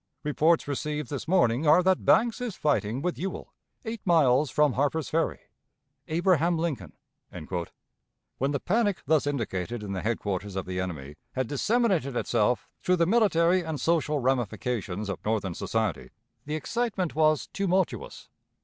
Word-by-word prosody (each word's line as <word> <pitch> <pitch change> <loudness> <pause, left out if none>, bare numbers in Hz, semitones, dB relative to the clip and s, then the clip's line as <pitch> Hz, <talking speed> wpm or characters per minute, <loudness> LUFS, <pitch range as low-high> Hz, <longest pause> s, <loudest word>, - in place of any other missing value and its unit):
Reports 155 +2 +2
received 150 +1 -3
this 140 - -4
morning 155 -6 +2
are 165 +5 +6
that 185 0 +2
Banks 235 +1 +3
is 240 -6 -3
fighting 135 -3 0
with 180 0 -2
Ewell, 190 +2 -5 0.3
eight 225 -1 -5
miles 150 -5 +4
from 150 0 +2
Harper's 145 +3 0
Ferry. 165 +1 0 0.7
"ABRAHAM 170 0 +2
LINCOLN." 145 - -3 1.5
When 135 - +1
the 140 -1 -1
panic 205 - 0
thus 155 -2 +2
indicated 115 -5 -3
in 100 -1 -5
the 95 - -3
headquarters 100 -3 -2
of 95 - -3
the 90 0 -4
enemy 75 -6 -5 0.2
had 130 0 -1
disseminated 180 - +1
itself 120 0 +1
through 180 - +2
the 170 -1 +2
military 185 -4 +3
and 160 -3 -4
social 160 -2 +1
ramifications 120 -6 -1
of 100 - -5
Northern 105 -4 -1
society, 110 0 -2 0.4
the 150 +1 -3
excitement 195 +1 -2
was 155 -1 +3
tumultuous. 190 -2 -1
150 Hz, 145 wpm, -27 LUFS, 115-175 Hz, 1.5 s, are